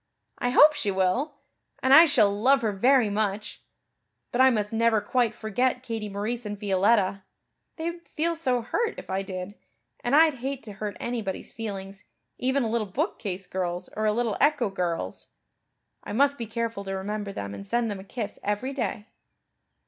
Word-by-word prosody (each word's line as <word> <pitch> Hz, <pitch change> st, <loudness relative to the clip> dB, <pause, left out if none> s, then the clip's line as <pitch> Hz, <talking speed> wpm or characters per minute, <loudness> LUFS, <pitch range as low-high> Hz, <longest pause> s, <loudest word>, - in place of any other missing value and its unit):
I 245 Hz, -, 0 dB
hope 295 Hz, +4 st, +7 dB
she 230 Hz, -8 st, -1 dB
will, 195 Hz, +11 st, 0 dB, 0.5 s
and 260 Hz, -, +5 dB
I 320 Hz, +4 st, +10 dB
shall 225 Hz, -10 st, +4 dB
love 260 Hz, +5 st, +3 dB
her 215 Hz, -, +1 dB
very 240 Hz, +2 st, +3 dB
much. 210 Hz, 0 st, -2 dB, 0.7 s
But 245 Hz, -, +2 dB
I 260 Hz, -, +8 dB
must 210 Hz, -3 st, -1 dB
never 225 Hz, -1 st, +3 dB
quite 235 Hz, +1 st, 0 dB
forget 250 Hz, +4 st, 0 dB
Katie 225 Hz, -4 st, -4 dB
Maurice 215 Hz, +5 st, -3 dB
and 205 Hz, -1 st, -5 dB
Violetta. 195 Hz, 0 st, +2 dB, 0.5 s
They 330 Hz, +1 st, -2 dB
would 340 Hz, 0 st, -15 dB
feel 335 Hz, +2 st, -1 dB
so 255 Hz, -7 st, 0 dB
hurt 460 Hz, -, -1 dB
if -, -, -8 dB
I 190 Hz, +1 st, 0 dB
did 185 Hz, 0 st, -6 dB, 0.5 s
and 245 Hz, +4 st, +1 dB
I'd 310 Hz, -4 st, +5 dB
hate 270 Hz, +1 st, -4 dB
to 210 Hz, -, -8 dB
hurt 205 Hz, +1 st, -5 dB
anybody's 225 Hz, -5 st, -3 dB
feelings, 195 Hz, -3 st, -6 dB, 0.4 s
even 260 Hz, +2 st, +1 dB
a -, -, 0 dB
little 225 Hz, -2 st, 0 dB
bookcase 195 Hz, -, -3 dB
girl's 180 Hz, -1 st, -3 dB
or 215 Hz, 0 st, 0 dB
a -, -, +4 dB
little 225 Hz, -1 st, 0 dB
echo 290 Hz, -7 st, +3 dB
girl's. 175 Hz, -3 st, -3 dB, 0.8 s
I -, -, -6 dB
must 280 Hz, +4 st, +3 dB
be 230 Hz, -, -4 dB
careful 230 Hz, -2 st, -3 dB
to 195 Hz, 0 st, -3 dB
remember 205 Hz, +1 st, -4 dB
them 100 Hz, -, -5 dB
and 200 Hz, -, -8 dB
send 235 Hz, +1 st, 0 dB
them 200 Hz, -, -5 dB
a -, -, -9 dB
kiss 210 Hz, +1 st, -6 dB
every 210 Hz, +7 st, -2 dB
day." 240 Hz, -5 st, -3 dB
220 Hz, 180 wpm, -26 LUFS, 200-255 Hz, 0.8 s, I